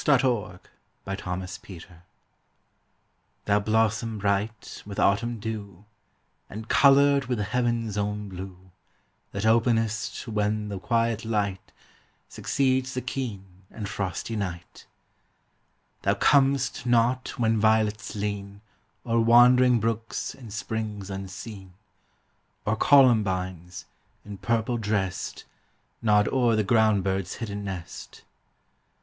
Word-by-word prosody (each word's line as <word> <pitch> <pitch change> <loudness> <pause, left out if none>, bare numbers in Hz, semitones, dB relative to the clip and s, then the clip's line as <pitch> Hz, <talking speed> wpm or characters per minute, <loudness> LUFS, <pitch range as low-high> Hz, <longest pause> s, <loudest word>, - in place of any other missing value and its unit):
THOMAS 135 -4 +4
MOORE. 105 -8 -1
TO - - -25 0.4
THE 95 - -3
FRINGED 90 0 -5
GENTIAN. 90 -2 -12 1.4
Thou 100 0 +3
blossom, 110 +1 0
bright 100 +2 -2
with 100 -1 -9
autumn 115 +4 +1
dew, 105 -3 -6 0.6
And 110 +2 -8
colored 140 0 +5
with 125 -1 -2
the 105 - -1
heaven's 115 -1 -1
own 105 0 -2
blue, 95 -1 -9 0.6
That 100 +2 -3
openest 115 -1 +1
when 105 -1 -1
the 100 -2 -5
quiet 115 +1 0
light 105 -4 -2 0.6
Succeeds 130 -1 0
the 130 - -1
keen 120 -6 -4 0.2
and 105 -3 -6
frosty 100 +4 -4
night; 90 -5 -6 1.1
Thou - - +1
comest 135 -3 +2
not 120 +2 +1
when 115 -2 +2
violets 110 -1 +1
lean 100 -1 -4 0.4
O'er 115 -1 +1
wandering 120 +1 +6
brooks 115 0 -2
and 120 -5 -12
springs 105 -2 -4
unseen, 95 0 -8 0.9
Or 105 - +1
columbines, 95 - +2 0.4
in 100 -2 -9
purple 115 +2 0
dressed, 105 -4 -2 0.6
Nod 105 -2 +3
o'er 120 -4 +2
the 110 - +2
ground 110 -2 +3
bird's 95 -1 -2
hidden 105 -3 -5
nest. 95 -4 -8
110 Hz, 115 wpm, -26 LUFS, 100-115 Hz, 1.4 s, wandering